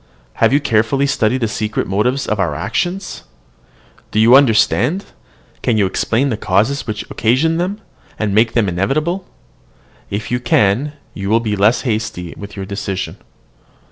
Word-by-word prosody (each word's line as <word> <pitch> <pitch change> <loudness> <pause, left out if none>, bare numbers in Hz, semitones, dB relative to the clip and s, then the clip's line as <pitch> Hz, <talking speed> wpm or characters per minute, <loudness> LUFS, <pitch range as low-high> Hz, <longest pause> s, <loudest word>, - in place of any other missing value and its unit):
Have 115 0 +5
you 140 - +4
carefully 125 +1 +1
studied 130 -2 +1
the 115 - +1
secret 105 0 -2
motives 125 +8 0
of 110 - -2
our 85 -6 0
actions? 180 - -3 0.9
Do 110 - 0
you 115 +3 +7
understand 135 - +3 0.6
can 115 - +1
you 100 - +3
explain 115 +7 0
the 115 - -1
causes 110 +10 0
which 110 -1 -3
occasion 135 +9 +2
them, 185 +4 -2 0.4
and 105 -2 -1
make 110 +2 +3
them 115 -4 +2
inevitable? 150 - -1 0.8
If 110 +3 -4
you 125 - +1
can, 120 +4 +2 0.2
you 100 0 -4
will 115 +2 +4
be 110 -3 -2
less 105 +4 +3
hasty 105 -7 -3
with 100 0 -9
your 100 -1 -5
decision." 100 -1 -4
110 Hz, 155 wpm, -17 LUFS, 100-135 Hz, 0.9 s, you